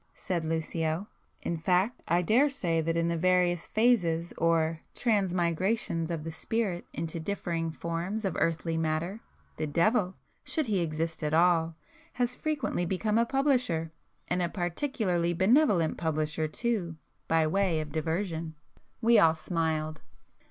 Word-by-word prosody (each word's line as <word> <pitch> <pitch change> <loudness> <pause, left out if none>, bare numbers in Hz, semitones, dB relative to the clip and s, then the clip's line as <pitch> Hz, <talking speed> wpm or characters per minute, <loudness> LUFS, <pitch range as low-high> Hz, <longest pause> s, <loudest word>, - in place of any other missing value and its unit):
—said 175 -3 -2
Lucio—"In 160 +2 -3
fact 185 +7 +1
I 175 +2 +2
daresay 215 - +2
that 165 +1 -1
in 165 0 +1
the 170 - 0
various 180 -1 +2
'phases' 175 -8 +2
or 165 -1 +1
transmigrations 185 -4 0
of 165 -3 -3
the 165 - -5
spirit 195 0 -2
into 165 0 -4
differing 165 -2 -2
forms 170 +6 -3
of 190 - -1
earthy 165 0 0
matter, 165 +6 -1 0.4
the 155 - -2
devil 185 +5 +2 0.3
(should 315 -3 -1
he 210 -5 +1
exist 160 0 -2
at 150 0 0
all) 165 -1 +3 0.4
has 245 0 0
frequently 300 - -2
become 210 +5 0
a 235 - +2
publisher,—and 185 - -1
a 175 - 0
particularly 175 - -1
benevolent 190 - +3
publisher 155 -1 -1
too!—by 165 -5 -2
way 180 0 +1
of 155 -1 -5
diversion." 160 +1 -2 0.5
We 230 0 +6
all 160 -1 +5
smiled. 160 -2 -2
170 Hz, 130 wpm, -29 LUFS, 160-200 Hz, 0.5 s, We